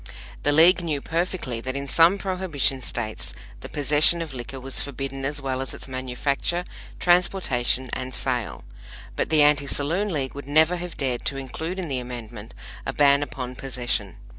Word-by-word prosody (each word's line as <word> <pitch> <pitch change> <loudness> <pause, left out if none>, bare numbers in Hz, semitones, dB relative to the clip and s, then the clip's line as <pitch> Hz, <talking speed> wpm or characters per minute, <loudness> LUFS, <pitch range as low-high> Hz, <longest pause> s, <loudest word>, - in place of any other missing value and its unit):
The 145 - +2
League 170 +5 +7
knew 155 -4 -1
perfectly 165 -7 -2
that 130 +2 -4
in 140 0 -3
some 165 +7 +5
Prohibition 180 -9 0
States 115 -3 -4 0.3
the - - -8
possession 150 +3 +4
of 155 -4 -8
liquor 130 +1 -6
was 135 +1 0
forbidden 135 0 -5
as 145 +1 -1
well 130 -1 -2
as 135 - -4
its - - -8
manufacture, 135 +6 -2 0.3
transportation 145 -9 +2
and 130 0 -3
sale; 125 -2 -2 0.5
but - - -1
the 155 -1 +4
AntiSaloon 150 +6 +2
League 135 -5 -2
would 140 -1 -8
never 160 +4 +4
have 175 0 -6
dared 130 -4 -1
to 135 - 0
include 160 +7 -5
in 185 -3 -3
the 135 -3 -1
Amendment 120 -3 -8 0.3
a - - -2
ban 140 -1 +5
upon 130 -3 -5
possession. 120 -7 -2
140 Hz, 165 wpm, -24 LUFS, 130-160 Hz, 0.5 s, League